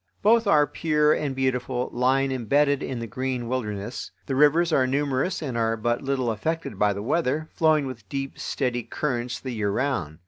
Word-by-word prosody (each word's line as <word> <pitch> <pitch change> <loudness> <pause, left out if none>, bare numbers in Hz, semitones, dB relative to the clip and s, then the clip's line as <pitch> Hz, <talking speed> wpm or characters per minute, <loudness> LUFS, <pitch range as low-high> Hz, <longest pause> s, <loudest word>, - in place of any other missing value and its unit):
Both 225 +1 +4
are 150 -6 +5
pure 150 -1 +2
and 140 -3 -2
beautiful, 125 -1 -1
lying 135 +2 +2
imbedded 140 +3 +2
in 130 - -4
the 115 - -4
green 125 +1 -3
wilderness. 105 -3 -4 0.2
The 135 - -3
rivers 155 +5 +4
are 130 -3 +3
numerous 140 +6 0
and 130 -5 -4
are 115 -1 +1
but 120 +2 0
little 135 -4 0
affected 135 -1 -3
by 105 -1 +3
the 100 +1 -5
weather, 155 +3 0
flowing 155 -3 +3
with 115 -6 -8
deep, 135 -1 -4
steady 125 -3 -1
currents 125 -1 -3
the 130 - -5
year 110 -3 -1
round. 100 - -1
130 Hz, 180 wpm, -25 LUFS, 120-145 Hz, 0.2 s, are